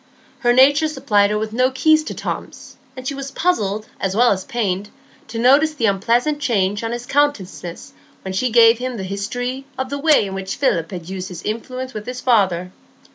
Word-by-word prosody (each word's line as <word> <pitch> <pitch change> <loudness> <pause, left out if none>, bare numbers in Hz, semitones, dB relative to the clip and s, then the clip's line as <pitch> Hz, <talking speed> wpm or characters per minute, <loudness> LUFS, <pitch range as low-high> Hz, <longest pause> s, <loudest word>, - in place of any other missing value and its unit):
Her 240 - +3
nature 285 +5 +5
supplied 205 -9 +2
her 210 - 0
with 215 0 -3
no 255 +2 +3
key 310 +4 +4
to 310 0 -2
Tom's; - - -6 0.2
and 255 0 -6
she 280 - -1
was 275 0 -6
puzzled 215 - 0
as 190 0 -2
well 240 +2 +5
as 190 -2 -1
pained 205 -4 -2 0.4
to 230 - -7
notice 280 +6 +4
the 235 - 0
unpleasant 235 +9 +1
change 205 -6 0
on 225 - -2
his 240 0 -5
countenance 245 -12 -2 0.3
when 190 - -5
she 250 +7 0
gave 230 0 +6
him 255 -1 -4
the 195 - -4
history 245 +7 -4
of 260 0 -3
the 285 - -3
way 300 -6 +4
in 195 - -6
which 195 0 -4
Philip 170 - 0
had 175 -3 -7
used 190 0 -5
his 180 -1 -8
influence 255 +4 -5
with 215 +1 -7
his 250 0 -5
father. 190 -8 +1
235 Hz, 200 wpm, -20 LUFS, 195-260 Hz, 0.4 s, gave